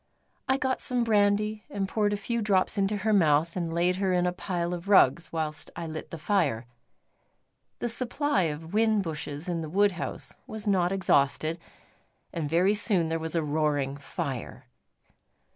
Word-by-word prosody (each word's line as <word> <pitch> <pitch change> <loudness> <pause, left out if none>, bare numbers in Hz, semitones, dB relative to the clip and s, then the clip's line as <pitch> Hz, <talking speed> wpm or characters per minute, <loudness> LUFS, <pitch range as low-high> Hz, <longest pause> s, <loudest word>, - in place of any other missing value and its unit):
I 265 - +4
got 260 -1 -1
some 250 -1 +1
brandy 210 -1 +2
and 195 -1 -2
poured 210 +1 +1
a 205 - 0
few 235 +3 -2
drops 195 -3 +2
into 200 +1 +1
her 215 +2 0
mouth, 165 -3 +3
and 170 -3 -2
laid 175 +2 +1
her 190 -1 0
in 180 -1 +2
a 180 - +2
pile 180 -1 -3
of 175 +3 -6
rugs 170 -4 +4
whilst 155 -2 -3
I 170 - -5
lit 155 -1 -6
the 165 - -6
fire. 155 - 0 1.1
The - - -2
supply 250 - 0
of 160 +1 -5
whin 215 -1 +3
bushes 150 -1 -5
in 170 -2 -2
the 155 - -5
wood 200 +4 +3
house 180 - -6
was 220 -1 -6
not 185 -3 +2
exhausted, 160 -3 +1 0.7
and 155 -3 -3
very 180 +5 +3
soon 195 -5 +1
there 165 0 -1
was 160 +1 -4
a 165 - +1
roaring 145 -2 0
fire. 145 - -5
180 Hz, 175 wpm, -27 LUFS, 160-205 Hz, 1.1 s, I